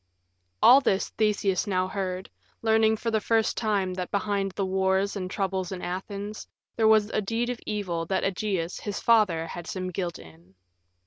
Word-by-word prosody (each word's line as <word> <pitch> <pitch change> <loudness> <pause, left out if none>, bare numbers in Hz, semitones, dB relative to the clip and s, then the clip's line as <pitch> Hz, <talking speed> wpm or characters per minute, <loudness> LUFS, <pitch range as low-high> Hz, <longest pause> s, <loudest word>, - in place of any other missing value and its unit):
All 265 +3 +9
this 195 -7 +1
Theseus 210 -3 0
now 185 -2 +1
heard, 185 -1 -3 0.4
learning 220 0 +3
for 230 +1 -2
the 220 -1 +1
first 225 0 +1
time 200 -5 0
that 180 -1 -4
behind 200 -1 -1
the 195 - -1
wars 190 +1 +1
and 185 -2 -4
troubles 190 -2 -2
in 185 -1 -5
Athens 200 +4 -5 0.3
there 220 -1 +3
was 220 -1 +4
a - - 0
deed 230 +4 -1
of 245 - -6
evil 180 -6 -2
that 190 - 0
Ægeus, 190 -3 -2
his 205 -1 -4
father, 205 -8 +3
had 175 +1 -7
some 185 -1 -4
guilt 175 -1 -3
in. 85 +4 -16
195 Hz, 175 wpm, -27 LUFS, 185-215 Hz, 0.4 s, All